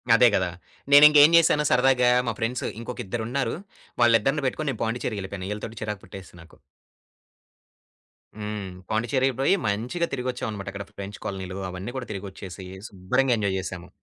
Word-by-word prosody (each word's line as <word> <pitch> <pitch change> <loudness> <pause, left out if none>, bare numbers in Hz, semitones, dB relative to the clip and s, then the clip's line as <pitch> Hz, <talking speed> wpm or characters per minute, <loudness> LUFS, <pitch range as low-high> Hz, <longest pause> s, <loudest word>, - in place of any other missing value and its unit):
అదే 125 +1 +6
గదా! 90 -2 +1 0.4
నేనింకేం 150 +1 +9
జేసాను 155 -2 +4
సరదాగా 125 -1 +4 0.2
మా 115 - 0
ఫ్రెండ్స్ 120 +2 -2
ఇంకొక 120 +2 -7
ఇద్దరున్నారు. 120 +5 -2 0.5
వాళ్ళిద్దరిని 120 +5 +3
బెట్టుకొని 145 +3 -2
నేను 115 - -8
పాండిచ్చేరికెళ్ళిపోయాను. 100 -5 -4
ఈళ్ళతోటి 105 +1 -6
చిరాకు 105 -3 -4
పుట్టేసి 95 0 -11
నాకు. 85 - -18 1.8
హ్మ్. 105 -2 -5 0.2
పాండిచెర్రికి 125 +4 +1
పోయి, 135 - +3
మంచిగా 120 +12 -1
తిరిగొచ్చాం 125 -2 -3
అనమాట. 100 -2 -7
అక్కడ 100 0 -7
ఫ్రెంచ్ 100 0 -8
కాలనీలు 95 -1 -5
అవన్నీ 90 +6 -6
కూడా 125 - -6
తిరిగొచ్చేసి, 95 -2 -8 0.2
శుభ్రంగా 120 +7 +1
ఎంజాయ్ 100 -3 0
జేసాము. 90 -2 -6
110 Hz, 135 wpm, -25 LUFS, 100-130 Hz, 1.8 s, నేనింకేం